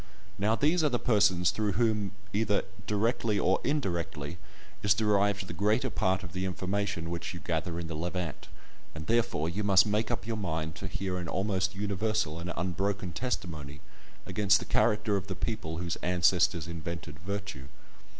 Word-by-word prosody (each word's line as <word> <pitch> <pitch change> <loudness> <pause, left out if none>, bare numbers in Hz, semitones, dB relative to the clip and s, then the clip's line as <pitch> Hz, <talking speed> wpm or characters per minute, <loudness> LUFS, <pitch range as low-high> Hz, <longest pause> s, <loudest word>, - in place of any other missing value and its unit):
Now 105 +3 +3
these 160 +6 +3
are 150 - +4
the 125 - +1
persons 95 -7 +3
through 105 -2 0
whom, 105 -1 +1 0.2
either 105 -1 +2 0.2
directly 105 0 +1
or 95 -1 +2
indirectly, 85 - -2 0.4
is 100 -1 +4
derived 100 -2 +2
the - - -7
greater 110 +5 +2
part 95 0 +1
of 85 -4 -8
the 95 - -2
information 95 -2 -2
which 85 +1 -4
you - - -6
gather 85 0 -2
in 85 - -4
the 80 - -5
Levant, 85 0 -3 0.5
and 80 0 -6
therefore 115 -9 +1
you 95 +5 -2
must 95 -1 +6
make 105 +1 +1
up 120 -3 -2
your 115 -1 -2
mind 80 -5 -2
to 95 - -4
hear 95 0 -3
an 85 - -4
almost 95 0 0
universal 100 -4 0
and 85 +1 -4
unbroken 95 +1 -1
testimony 80 - -3 0.5
against 105 -1 +4
the - - -5
character 105 -2 +2
of 95 - -5
the 95 - -3
people 95 -7 -3
whose 85 -1 -2
ancestors 90 -2 +2
invented 85 -3 -6
virtue. 95 -6 -5
95 Hz, 170 wpm, -30 LUFS, 85-105 Hz, 0.5 s, must